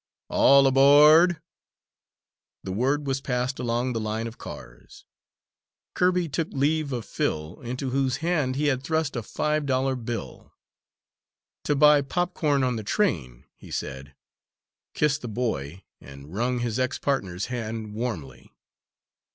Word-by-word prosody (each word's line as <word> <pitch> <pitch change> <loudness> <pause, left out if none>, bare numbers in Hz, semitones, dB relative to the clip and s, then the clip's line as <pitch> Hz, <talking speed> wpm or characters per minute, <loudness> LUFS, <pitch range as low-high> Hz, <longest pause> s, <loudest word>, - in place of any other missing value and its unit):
"All 140 0 +5
aboard!" 150 +6 +6 1.2
The 95 - -5
word 135 +8 0
was 135 -1 -1
passed 125 +1 -2
along 120 +1 -1
the 115 - -2
line 110 +1 -3
of 115 0 -8
cars. - - -11 0.9
Kirby 180 -1 +2
took 160 +2 -2
leave 145 +1 0
of 120 -4 -4
Phil, 75 +2 -3
into 125 +2 -4
whose 135 -1 0
hand 160 -6 0
he 150 +2 -1
had 135 -3 +1
thrust 160 0 -1
a 120 - -2
five 150 +6 -2
dollar 130 0 +1
bill, 120 -3 -7 1.1
"To 145 - +1
buy 150 0 +6
popcorn 150 -2 0
on 125 -2 0
the 110 - -5
train," 75 - -1
he - - -15
said, 65 +1 -6 0.8
kissed 150 0 +1
the 120 - -6
boy, 95 - -3 0.2
and 70 +3 -13
wrung 120 +4 0
his 120 0 -2
ex 130 0 0
partner's 100 -10 -2
hand 110 -2 -5
warmly. 100 - -5
130 Hz, 135 wpm, -25 LUFS, 110-145 Hz, 1.2 s, aboard